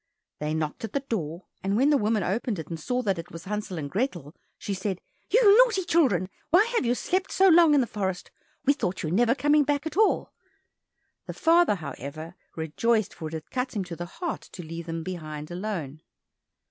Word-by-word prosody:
They 150 +1 -2
knocked 155 +3 -3
at 225 - -5
the 280 - 0
door, 180 - -4 0.2
and 195 +2 +1
when 275 +5 +4
the 290 - +5
woman 215 -1 +1
opened 210 +4 -1
it 160 - -7
and 165 -1 -5
saw 250 +10 -1
that 195 -5 0
it 165 - -8
was 165 0 -9
Hansel 205 -2 -4
and 145 -3 -3
Grethel, 175 - -2 0.2
she 200 - -4
said, 190 -1 -3 0.3
"You 420 -3 +6
naughty 470 -6 +4
children, 255 - +3 0.2
why 360 +7 +6
have 365 - +1
you 240 - +2
slept 370 +8 -1
so 385 0 +5
long 330 -3 +7
in 280 - +5
the - - +1
forest?—we 205 +7 -3
thought 190 -10 -3
you 155 - -1
were 170 - 0
never 240 +3 +4
coming 295 +1 +4
back 285 +1 -1
at 320 +2 -5
all!" 435 0 +2 0.9
The - - -4
father, 335 -7 +4
however, 155 -1 -7 0.2
rejoiced, 210 +8 0
for 160 - -6
it 160 - -6
had 160 -1 -8
cut 250 -1 -2
him 200 - 0
to 175 -2 -7
the 175 +1 -6
heart 335 - -4
to 180 - -7
leave 165 +1 -7
them 165 0 -4
behind 155 -3 -6
alone. 175 -6 -4
200 Hz, 210 wpm, -26 LUFS, 165-280 Hz, 0.9 s, long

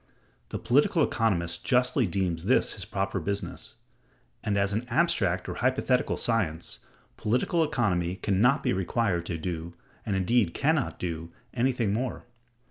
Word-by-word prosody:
The - - -3
political - - +3
economist 85 -7 0
justly 125 -1 +2
deems 90 -3 -1
this - - +3
his - - -6
proper 95 0 -2
business: 100 +4 -4 0.7
and, 105 -1 0
as 100 0 +1
an 115 +4 -2
abstract 100 - +1
or - - -3
hypothetical 130 0 +1
science, 90 -9 -1 0.4
political 125 +9 +1
economy 95 - 0
can 95 0 0
not 135 +5 +4
be - - +1
required 95 -2 0
to 85 - -2
do, 85 0 -5 0.3
and 100 - -1
indeed 95 -1 +2
can 155 +3 +3
not 145 -6 -1
do, 85 -1 -4 0.2
anything 120 -4 +1
more. 125 +2 -3
100 Hz, 145 wpm, -28 LUFS, 90-125 Hz, 0.7 s, not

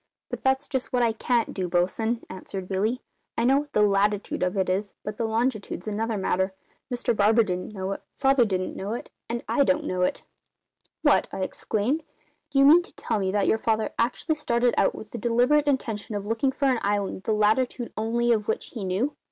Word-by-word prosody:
"But - - -4
that's 265 0 +1
just 265 -2 -3
what 245 -1 +2
I 230 - +3
can't 235 +1 0
do, 185 -2 -2
bosun," 220 +7 0
answered 190 0 -7
Billy. 210 +6 -1 0.3
"I 230 - +1
know 270 +3 +4
what 290 0 -8
the 210 - +4
latitude 205 0 +1
of 180 +2 0
it 190 - +1
is, 195 +2 -1
but 210 0 -5
the 230 - -1
longitude's 220 -4 -1
another 220 +1 -1
matter. 190 0 0 0.4
Mr 240 -1 0
Barber 215 +3 +4
didn't 180 -1 -3
know 190 0 -3
it; 195 - -4 0.2
Father 270 -2 +4
didn't 185 -4 -2
know 200 +3 -4
it; 240 - -6 0.2
and 235 0 -3
I 280 - +3
don't 280 +3 +2
know 185 -7 -1
it." 180 - 0 0.8
"What!" - - +4
I - - -4
exclaimed. 230 +9 -1 0.5
"Do 285 - -2
you 275 - +7
mean 320 +5 +8
to 350 - -15
tell 215 - -2
me 190 -1 0
that 205 -2 +2
your 220 - +2
father 220 -1 0
actually 255 +7 0
started 240 -4 +1
out - - +2
with 215 - -10
the 235 - -5
deliberate 245 +7 +3
intention 225 -6 -1
of 205 -1 -3
looking 225 +5 +1
for 280 - -2
an 260 -3 +3
island 200 -1 -1
the - - 0
latitude 230 +3 +1
only 235 +2 +1
of 215 -3 +1
which 220 - -2
he 225 -6 -6
knew?" 195 +10 -1
225 Hz, 210 wpm, -26 LUFS, 200-245 Hz, 0.8 s, mean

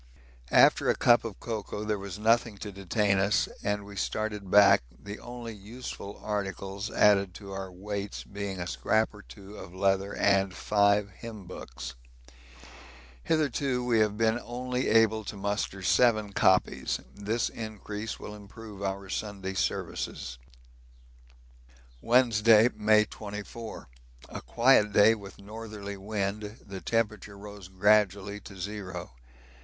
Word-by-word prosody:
After - - +5
a - - +4
cup 120 -1 +5
of 115 -4 -6
cocoa 105 -2 -4
there 105 -1 -1
was 100 0 -6
nothing 115 0 +2
to 105 +1 -6
detain 100 +1 +1
us, 100 +2 +2
and 105 0 -1
we 100 0 -10
started 105 0 -3
back, 100 -6 +7 0.2
the 100 +6 -8
only 120 -2 -7
useful 105 -1 -8
articles 100 0 -3
added 100 -5 +4
to 100 -2 -9
our 95 -1 -5
weights 100 +2 -5
being 100 -2 -5
a 85 - -3
scrap 110 +5 +1
or 105 - -12
two 100 0 -13
of 90 -3 -10
leather 95 +1 +1
and 100 -2 +2
five 100 +1 +2
hymn 110 -1 -9
books. - - -8 1.3
Hitherto 140 -5 +1
we 120 -2 +3
have 105 -1 +2
been 115 +1 +2
only 125 +1 -2
able 110 0 +4
to 100 - -6
muster 100 -1 -2
seven 110 -1 +3
copies; 95 -1 +2
this 105 +3 -1
increase 110 -1 -6
will 105 - -7
improve 105 0 -11
our 100 0 -3
Sunday 95 -1 -4
Services. 65 -8 -3 1.6
Wednesday, 115 -2 +5
May 110 0 +4
24. 105 +2 -8 0.4
A - - -7
quiet 115 -4 +4
day 105 +2 +7
with 100 -3 -9
northerly 105 -1 -7
wind; 105 +1 -3
the 95 -2 -7
temperature 110 -3 -1
rose 100 -2 -10
gradually 100 +1 +2
to 100 -1 -12
zero. 95 -6 -6
105 Hz, 135 wpm, -29 LUFS, 100-110 Hz, 1.6 s, back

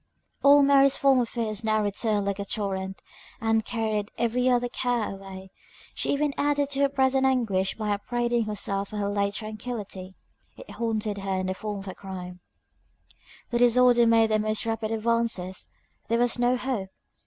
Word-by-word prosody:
All 285 0 +7
Mary's 275 -1 +5
former 265 -3 +3
fears 225 -2 -3
now 215 -1 +1
returned 205 0 0
like 200 0 -2
a - - -1
torrent, 195 -2 -4 0.4
and 225 0 +1
carried 215 -2 -2
every 250 +2 +1
other 245 -1 +2
care 245 -2 -1
away; 190 -1 -10 0.4
she - - -2
even 290 0 0
added 285 -1 +1
to 275 - -1
her 280 0 +4
present 265 -1 +2
anguish 225 -8 +1
by 215 -2 -2
upbraiding 240 +3 0
herself 200 -1 -2
for 215 - -6
her 200 -1 -1
late 200 0 0
tranquillity 215 -4 -6 0.4
it - - -11
haunted 215 -3 -2
her 195 0 -3
in 185 0 -1
the 185 - -1
form 210 +2 -5
of 195 - -11
a 185 - -5
crime. 180 -2 -8 1.1
The 240 - 0
disorder 245 0 +5
made 225 -1 +4
the 215 - +3
most 215 +1 0
rapid 225 -1 -2
advances 225 -4 -1 0.4
there 230 - +1
was 245 0 +1
no 245 +1 +3
hope! 245 -7 -3
220 Hz, 170 wpm, -26 LUFS, 200-245 Hz, 1.1 s, All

